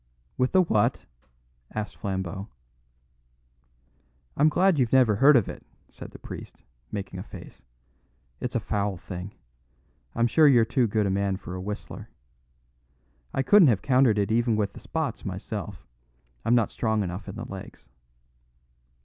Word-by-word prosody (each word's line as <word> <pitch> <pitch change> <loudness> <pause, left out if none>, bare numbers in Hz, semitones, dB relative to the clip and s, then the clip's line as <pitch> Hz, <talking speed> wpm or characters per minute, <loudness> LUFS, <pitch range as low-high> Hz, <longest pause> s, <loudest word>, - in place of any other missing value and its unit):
"With 125 0 +1
the 185 -1 +5
what?" 110 -11 +1 0.7
asked 105 -1 -4
Flambeau. 95 -1 -4 1.9
"I'm 150 +2 +4
glad 180 0 +3
you've 120 -3 +2
never 125 -6 +4
heard 140 +5 +7
of 115 -6 +4
it," - - -8 0.3
said - - -10
the - - -12
priest, - - -10 0.3
making 100 -2 -5
a - - -5
face. - - -12 0.8
"It's 125 +1 -4
a - - +3
foul 100 -2 -2
thing. 90 +2 -7 0.8
I'm 115 - +2
sure 150 +6 +5
you're 120 -5 +5
too 120 +1 +1
good 105 0 0
a 95 - 0
man 100 0 0
for 90 -2 -9
a 90 - -5
Whistler. 105 +2 -7 1.2
I 135 - 0
couldn't 205 +1 +7
have 110 -7 +2
countered 125 -5 +4
it 100 +1 0
even 115 0 +2
with 105 -2 -1
the - - -10
Spots - - -3
myself; - - -6 0.6
I'm 120 - +3
not 115 -3 +2
strong 110 -2 0
enough 90 +2 -6
in 95 - -7
the 110 - -6
legs." 95 -1 -10
110 Hz, 155 wpm, -26 LUFS, 100-125 Hz, 1.9 s, heard